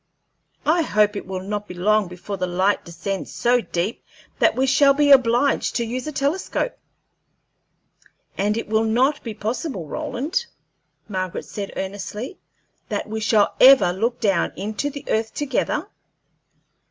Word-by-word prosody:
I 330 +3 +3
hope 210 -8 +2
it 200 - -5
will 185 -1 -4
not 205 +1 -4
be 180 - -8
long 210 +3 +2
before 180 +3 -6
the 185 -1 -2
light 185 +3 +1
descends 170 +4 -5
so 245 +1 +2
deep 185 +2 -3 0.4
that - - +4
we 260 - +2
shall 275 +1 +5
be 290 0 +4
obliged 255 +1 +4
to 235 - 0
use 250 +5 -4
a - - -2
telescope." 305 - -1 1.6
"And 210 +2 0
will 220 +1 +2
it - - 0
not 260 +6 +2
be 225 -3 -6
possible, 220 - -3
Roland," 280 - -3 0.6
Margaret 185 -3 -4
said, 200 -1 -6
earnestly, 205 - -5 0.5
"that - - -2
we 220 +1 -4
shall 210 -1 +3
ever 260 -9 +8
look 235 +6 -1
down 195 -5 +1
into 215 +9 -3
the 285 -1 -9
earth 220 0 -1
together? 290 -2 -1
220 Hz, 150 wpm, -22 LUFS, 195-265 Hz, 1.6 s, ever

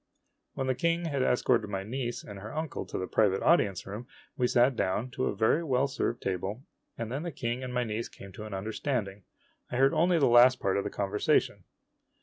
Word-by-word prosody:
O - - -49 0.2
When 135 - -2
the 130 - +1
King 170 +5 0
had 140 -4 -1
escorted 125 -3 +2
my 95 -1 -3
niece 120 +3 -4
and 100 -1 -9
her 105 +3 -8
uncle 155 -1 -4
to - - -4
the 95 - -2
private 100 -1 +2
audience 100 - +3
room, 105 +5 -7 0.3
we 125 - +1
sat 120 +2 +3
down 110 +7 -1
to 130 +2 -2
a - - -2
very 110 +10 +2
well 135 -3 +2
served 125 -3 -2
table, 95 +6 -3 0.3
and 115 -1 -4
then 135 +3 -2
the 170 0 -4
King 125 -3 -3
and 130 - -5
my 125 0 0
niece 110 0 -3
came 100 - -12
to 105 +3 -8
an 105 - -7
understanding. 105 -1 -3 0.4
I - - -4
heard 135 +1 +4
only 175 +2 +3
the 145 - +4
last 120 +2 +6
part 95 - 0
of 100 - 0
the - - -3
conversation. 100 +1 0
120 Hz, 220 wpm, -29 LUFS, 105-135 Hz, 0.4 s, last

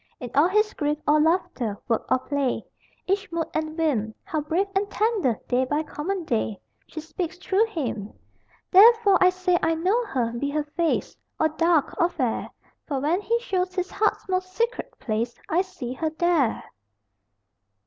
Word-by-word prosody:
In 245 - -7
all 295 +4 +5
his 425 +3 +2
grief 295 0 -1
or 300 +1 +5
laughter, 300 - 0
work 230 -2 0
or - - +4
play, 275 0 -2 0.4
Each 395 0 -1
mood 335 -1 -1
and 315 0 -3
whim, 235 -10 0
How 310 - -2
brave 330 +6 0
and 400 +1 +1
tender, 415 - +1
day 250 +1 +2
by 295 +4 0
common 350 +5 -4
day, 110 - -1 0.3
She 315 - -7
speaks 330 +2 -5
through 390 +4 +1
him! 240 - -4 0.6
Therefore 420 0 +7
I 365 - +7
say 365 -1 +1
I 325 0 +2
know 380 +9 +1
her, 245 - -1
be 280 +4 -2
her 300 +1 -1
face 320 +2 -1 0.2
Or 315 - +3
dark 325 -1 +2
or 340 - +4
fair 255 -9 -2 0.4
For 280 -3 -1
when 320 +8 +1
he 465 +3 +1
shows 370 -6 -1
his 365 -1 -2
heart's 430 +1 0
most 370 0 -1
secret 470 +4 -2
place 230 +1 -2
I 340 +3 +3
see 255 -10 -6
her 315 +4 -1
there! 320 -6 +1
325 Hz, 170 wpm, -25 LUFS, 280-375 Hz, 0.6 s, Therefore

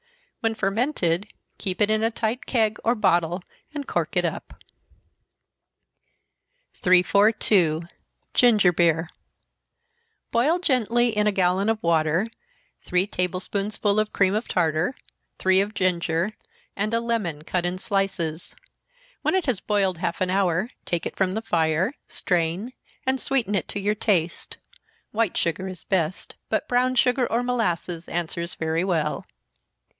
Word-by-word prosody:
When 225 -1 0
fermented, 195 - 0 0.3
keep 185 -3 -3
it 210 0 +3
in 215 0 +2
a 225 - +2
tight 230 +2 -3
keg, 220 -4 +1
or 235 +2 +2
bottle 175 -4 +1 0.3
and 290 -2 -6
cork - - -1
it - - +3
up. - - -5 2.1
342. 185 -2 +3 0.5
Ginger 210 -7 +5
Beer. 165 -1 +2 1.2
Boil 270 +9 +3
gently, 240 - +1
in 210 0 +2
a - - +4
gallon 190 +1 +2
of 225 - +2
water, 165 +3 +2 0.6
three 180 +1 +1
table 180 -2 -2
spoonsful 205 +2 -1
of 215 0 0
cream 195 -1 +2
of 215 +3 -1
tartar, 165 - +1 0.4
three 190 0 +4
of 205 +2 -3
ginger, 175 0 0 0.4
and 210 +2 -1
a - - +2
lemon 215 -10 -2
cut 180 +2 -1
in 175 +1 -1
slices. 185 -5 -2 0.7
When - - +1
it 375 - +1
has 250 -9 0
boiled 195 -5 0
half 170 - -2
an 185 0 +1
hour, 190 +3 +1 0.2
take 170 -2 -1
it - - -4
from 190 0 0
the 220 - -3
fire, 165 - +1
strain 180 +7 -1 0.3
and 260 0 0
sweeten 250 -6 0
it 195 - 0
to - - -4
your 205 +1 +1
taste 185 -6 -1 0.5
white 220 -3 0
sugar 180 +3 -1
is 185 -3 -7
the - - -44
best, 180 -2 -1 0.2
but - - 0
brown 255 +1 +2
sugar 250 0 +2
or 235 +2 +1
molasses 175 -8 -1
answers 170 0 -3
very 160 +1 -1
well. 160 -5 -1
195 Hz, 145 wpm, -24 LUFS, 175-225 Hz, 2.1 s, Ginger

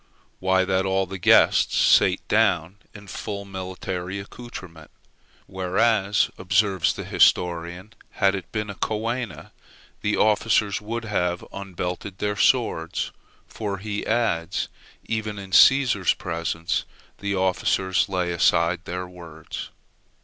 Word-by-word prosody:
Why, 95 0 +2
that 95 0 +1
all 95 0 +1
the 95 +1 -7
guests - - +5
sate - - +4
down 85 +3 +2
in 100 0 -12
full 100 +1 -6
military 95 -1 -5
accoutrement; 95 -7 -10 0.6
whereas, 95 +2 +1
observes 95 -1 +2
the - - -6
historian, 90 +3 +1 0.2
had 95 -2 +2
it 95 -3 -6
been 105 -2 -3
a - - -7
coena, 115 +3 -3 0.5
the 105 - 0
officers 105 -1 +2
would 115 +2 -4
have 90 -4 -1
unbelted 95 0 -5
their 105 +1 -1
swords; 100 -8 +1 0.3
for, 100 -3 -4
he 100 +1 -4
adds, 100 -7 0 0.4
even 110 -1 -3
in 95 -1 -8
Cæsar's 120 - +5
presence 85 0 -2 0.4
the 100 0 -2
officers 95 0 +1
lay 90 -2 -1
aside 85 +1 +2
their 90 +1 -4
swords. 85 -3 -9
95 Hz, 120 wpm, -24 LUFS, 90-105 Hz, 0.6 s, guests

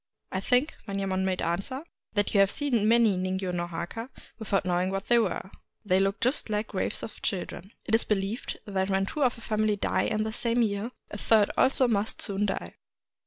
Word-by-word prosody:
" - - -59
I 190 - -1
think," 250 +9 +2
Manyemon 195 -1 -1
made 185 -1 0
answer, 195 - -2
" - - -50
that 205 -1 +1
you 200 - +4
have 195 -1 +6
seen 240 -5 +1
many 225 -4 +4
ningyo 185 0 -2
no 175 -1 -1
Jiaka 175 +8 -5 0.3
without 200 -4 0
knowing 180 +1 +1
what 195 0 -4
they 240 0 +6
were; 200 -3 -1
— - - -50
they 185 -2 +3
look 195 +2 +1
just 255 -1 0
like 210 0 -1
graves 190 - -2
of 215 - -8
children. 185 0 -4
It 220 - -4
is 225 - +7
believed 205 +3 -2
that 195 -1 -1
when 195 0 +2
two 295 - -4
of 250 -3 +2
a - - -12
family 215 -1 +1
die 205 - 0
in 215 0 0
the 220 0 -3
same 235 +1 +1
year, 205 +1 -1 0.2
a 210 - -6
third 215 -1 +4
also 260 -1 +4
must 215 -2 0
soon 205 -1 -1
die. 85 - -4
205 Hz, 215 wpm, -28 LUFS, 190-225 Hz, 0.3 s, is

